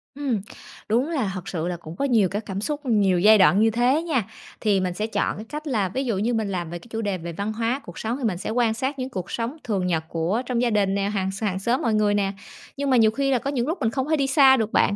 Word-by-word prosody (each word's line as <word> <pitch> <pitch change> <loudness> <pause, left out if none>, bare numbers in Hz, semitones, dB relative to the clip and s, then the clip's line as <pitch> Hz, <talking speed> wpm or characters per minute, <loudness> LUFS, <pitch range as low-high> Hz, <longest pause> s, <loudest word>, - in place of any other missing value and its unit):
Ừm, 270 -7 -1 0.5
đúng 245 +7 +2
là 260 -12 -1
thật 185 0 -7
sự 170 -3 -3
là 180 -1 -3
cũng 165 -1 -10
có 280 - -1
nhiều 225 -8 +3
các 205 +3 -4
cảm 195 0 -4
xúc, 295 +6 -2
nhiều 200 -7 +3
giai 215 +4 +7
đoạn 195 0 +5
như 225 +1 +5
thế 245 +7 +2
nha. 295 -9 0 0.4
Thì 205 -3 +2
mình 185 -1 -1
sẽ 210 +4 -2
chọn 220 - -1
cái 215 - -7
cách 305 +1 -6
là, 210 -9 0
ví 265 +8 -2
dụ 230 -6 -1
như, 225 +5 0
mình 220 -3 -1
làm 175 -3 -3
về 175 +1 -6
cái 235 - -17
chủ 225 0 -3
đề 200 -3 -1
về 170 0 -7
văn 200 +5 -3
hóa, 230 +5 -1
cuộc 175 - -9
sống 230 +3 -2
thì 275 - -7
mình 205 -7 0
sẽ 185 - -5
quan 230 0 +2
sát 265 +5 -3
những 255 0 -3
cuộc 190 -7 -6
sống 235 +6 -3
thường 195 -5 -1
nhật 165 -3 0
của 170 +8 -1
trong 245 -1 -1
gia 245 - +2
đình 205 -3 +1
nè, 200 0 0
hàng 195 -2 -1
sàng 195 -1 -2
xóm 235 +6 0
mọi 230 - +1
người 210 -1 +2
nè. 200 -1 +1 0.5
Nhưng 280 0 -1
mà 255 - +4
nhiều 220 -2 +5
khi 275 +4 0
là 255 - +3
có 275 - -3
những 250 -3 -1
lúc 330 +4 -1
mình 225 - +1
không 265 +3 -2
thể 315 - +3
đi 275 -2 +1
xa 265 -1 +6
được 220 -2 -1
bạn, 200 - +3
220 Hz, 300 wpm, -24 LUFS, 195-255 Hz, 0.5 s, giai